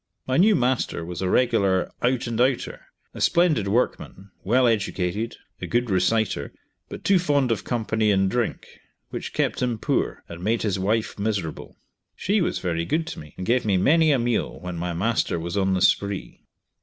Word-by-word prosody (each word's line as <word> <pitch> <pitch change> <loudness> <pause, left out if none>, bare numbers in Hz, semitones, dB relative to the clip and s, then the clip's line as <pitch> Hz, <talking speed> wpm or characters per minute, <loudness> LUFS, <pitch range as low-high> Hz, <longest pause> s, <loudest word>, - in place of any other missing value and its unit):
My 130 - 0
new 205 +4 +5
master 125 - 0
was 90 +1 -6
a 95 - 0
regular 100 -6 +2
"out 125 0 +1
and 115 0 -1
outer" 130 0 -1 0.3
a - - -8
splendid 165 - +3
workman, 100 -3 -2
well 125 +6 +3
educated, 105 -1 -1 0.2
a - - -4
good 120 -2 0
reciter, 95 +4 +1 0.4
but - - -8
too 195 -2 +4
fond 145 -7 +1
of 110 - -1
company 110 -2 0
and 95 -1 +3
drink, 120 +3 -2 0.5
which - - -5
kept - - -1
him 125 -2 0
poor, - - -1
and 85 +1 -9
made 110 +3 0
his 100 -3 0
wife 105 +3 -1
miserable. 100 -6 -3 0.4
She 205 +1 0
was - - 0
very 85 -2 -2
good 155 - -1
to - - -10
me, 75 -1 -12
and 90 - -5
gave 125 +4 +2
me 100 -3 +2
many 155 - +4
a 140 - +4
meal 120 -1 -1
when 90 -1 -6
my 85 +1 -3
master 100 -1 0
was 85 +2 -4
on 95 -1 +1
the 95 - +1
spree. 100 -1 0
110 Hz, 185 wpm, -24 LUFS, 95-125 Hz, 0.5 s, new